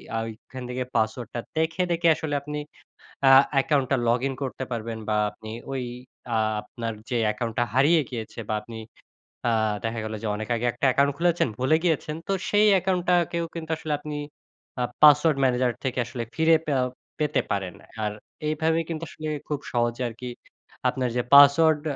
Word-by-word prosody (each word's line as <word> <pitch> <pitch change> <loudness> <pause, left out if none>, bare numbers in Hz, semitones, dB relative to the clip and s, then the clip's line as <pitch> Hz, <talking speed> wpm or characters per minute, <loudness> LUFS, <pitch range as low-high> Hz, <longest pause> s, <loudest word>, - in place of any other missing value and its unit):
আ - - +1 0.3
ঐখান 130 -1 -8
থেকে 125 +1 -2
পাসওয়ার্ডটা 115 +1 -1 0.2
দেখে, 160 +2 +1
দেখে 170 0 +2
আসলে 155 -2 -4
আপনি 150 +1 -5 0.7
আ - - +7 0.2
অ্যাকাউন্টটা 135 -1 +2
লগ 120 +1 +4
ইন 135 - -4
করতে 130 0 -3
পারবেন 115 -1 -4
বা 110 - +1 0.2
আপনি 110 - -11 0.2
ঐ - - -4 0.6
আ - - +3 0.2
আপনার 115 +1 -5 0.2
যে 125 - 0
অ্যাকাউন্টটা 115 +3 -1
হারিয়ে 150 +5 +5
গিয়েছে 115 -3 -6
বা 110 - 0
আপনি 115 +1 -10 0.7
আ - - +2 0.3
দেখা 115 0 -2
গেলো 110 0 -4
যে - - -1
অনেক 110 +1 -5
আগে 115 +1 -2
একটা 120 +4 -2
অ্যাকাউন্ট 140 +2 +3
খুলেছেন 175 -2 +2
ভুলে 130 +5 +3
গিয়েছেন 155 -3 0
তো 195 - +1 0.2
সেই 210 +1 +4
অ্যাকাউন্টটাকেও 175 -2 +1
কিন্তু 165 -1 -5
আসলে 155 -1 -3
আপনি 150 0 -6 0.7
আ - - +2 0.2
পাসওয়ার্ড 150 0 +7
ম্যানেজার 125 -1 +2
থেকে 130 -1 -1
আসলে 120 0 -5
ফিরে 160 0 +5
পেয়াও 130 -4 +1 0.3
পেতে 150 -1 +1
পারেন 95 -3 -2 0.3
আর 105 - 0 0.4
এইভাবে 160 +1 +1
কিন্তু 165 -1 -4
আসলে 155 - -7 0.2
খুব 150 -2 -2
সহজে 120 +1 0
আর - - -10
কি 125 - -4 0.6
আপনার 130 -1 -1
যে - - +3
পাসওয়ার্ড 145 +2 +7
135 Hz, 170 wpm, -25 LUFS, 120-160 Hz, 0.7 s, আ